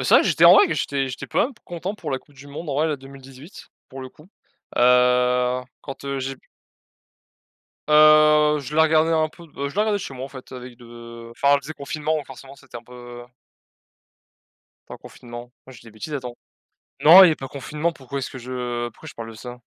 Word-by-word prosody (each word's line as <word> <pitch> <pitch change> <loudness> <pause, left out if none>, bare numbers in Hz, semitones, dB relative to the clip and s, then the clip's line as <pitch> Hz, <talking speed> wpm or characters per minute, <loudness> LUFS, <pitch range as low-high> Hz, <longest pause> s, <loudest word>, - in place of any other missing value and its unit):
c'est - - -2
vrai - - +7
que - - 0
j'étais - - +3
en - - +9
vrai 410 - +6
que - - -1
j'étais 135 -1 -2
j'étais 130 - -7
quand - - -1
même 265 +3 -3
content 175 +3 -6
pour 165 -8 -7
la 135 - -2
coupe 145 - -26
du 140 +1 -14
monde, 150 +3 -9
en 140 - -3
vrai, 150 +3 +1
là, 150 - -2
2018 135 +3 -14 0.2
pour 135 - -10
le 130 - -8
coup, 150 +6 -20 0.5
heu, 125 0 +3 0.2
quand, 135 -1 -10
heu, 140 0 -3
j'ai 135 0 -5
p - - -32 1.4
Heu, 150 0 +5
je 140 +2 -7
la 160 - +5
regardais 160 +1 +2
un 155 -1 +1
peu 170 +2 -16
de 140 -2 -6
je - - -14
la 210 - +2
regardais 215 -1 0
chez 185 -8 -7
moi 130 0 -7
en - - -9
fait 130 -2 -13
avec 125 -1 -10
de 115 -1 -12
enfin 140 +4 +2
c'était 150 +3 -8
confinement 155 +1 -3
forcément 135 +1 -13
c'était 125 - -16
un 120 - -8
peu 120 0 -12 1.7
Attends, - - -9
confinement, 120 0 -12
non 130 - -14
je 125 - -14
dis - - -20
des - - -14
bêtises 110 +8 -8
attends. 125 -4 -6 0.7
Non 165 +5 +9
il - - +9
y - - +6
avait 160 - +1
pas 135 - -8
confinement 150 +5 -4
pourquoi 140 -1 -8
est-ce 130 - -6
que 130 - -9
je 120 -1 -4
pourquoi 115 - -16
je - - -10
parle 115 -1 -8
de 115 - -12
ça? 125 +2 -10
135 Hz, 230 wpm, -22 LUFS, 125-150 Hz, 1.7 s, en